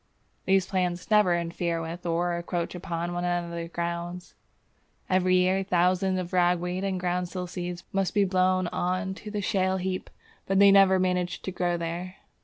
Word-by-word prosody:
These 190 -1 +3
plants 180 0 -2
never 205 -5 +5
interfere 170 0 -2
with 165 +2 -6
or 170 +1 0
encroach 170 0 -3
upon 175 -1 -4
one 175 0 -2
another's 170 -1 -2
grounds. 170 +1 -4 0.8
Every 185 0 +3
year 185 +1 +3
thousands 185 +1 +2
of 180 -1 -4
ragweed 180 +1 +1
and 190 -2 -1
groundsel 180 0 -2
seeds 175 -1 -5
must 195 0 0
be 205 -1 +4
blown 185 0 +2
on 185 +3 -1
to 210 +2 -9
the 210 -1 -3
shale 190 -2 +1
heap, 185 0 -3 0.4
but 195 - +1
they 200 0 +7
never 195 -1 +6
manage 180 -1 -1
to 190 - -3
grow 175 -1 -1
there. 170 +2 -5
180 Hz, 165 wpm, -27 LUFS, 175-185 Hz, 0.8 s, they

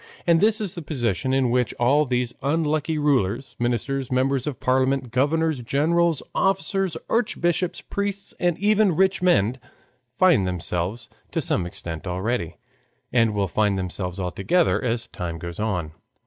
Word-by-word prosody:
And 170 -1 +4
this 215 +1 +4
is 205 -5 -2
the 170 - -6
position 130 - -1
in 130 -2 +2
which 125 -2 +1
all 140 +5 +3
these 125 -1 0
unlucky 155 +2 0
rulers, 135 -5 0
ministers, 125 +3 -1
members 130 +1 +1
of 145 - -4
parliament, 130 -1 +1
governors, 150 +3 +1
generals, 160 +5 +1
officers, 195 -2 0
archbishops, 180 -6 0
priests, 200 0 -4
and 175 -2 +1
even 210 -2 +3
rich 190 +2 +2
men 130 - +2 0.6
find 170 - +4
themselves 90 +5 -2 0.2
to - - -2
some 85 - +1
extent 85 -2 -6
already, 90 -1 -2 0.6
and 115 -3 +3
will 100 -1 +1
find 105 +2 +1
themselves 90 0 -4
altogether 95 - +1
as 120 -1 -1
time 85 -2 -5
goes 85 +2 -7
on. 95 -8 -2
130 Hz, 145 wpm, -24 LUFS, 105-165 Hz, 0.6 s, And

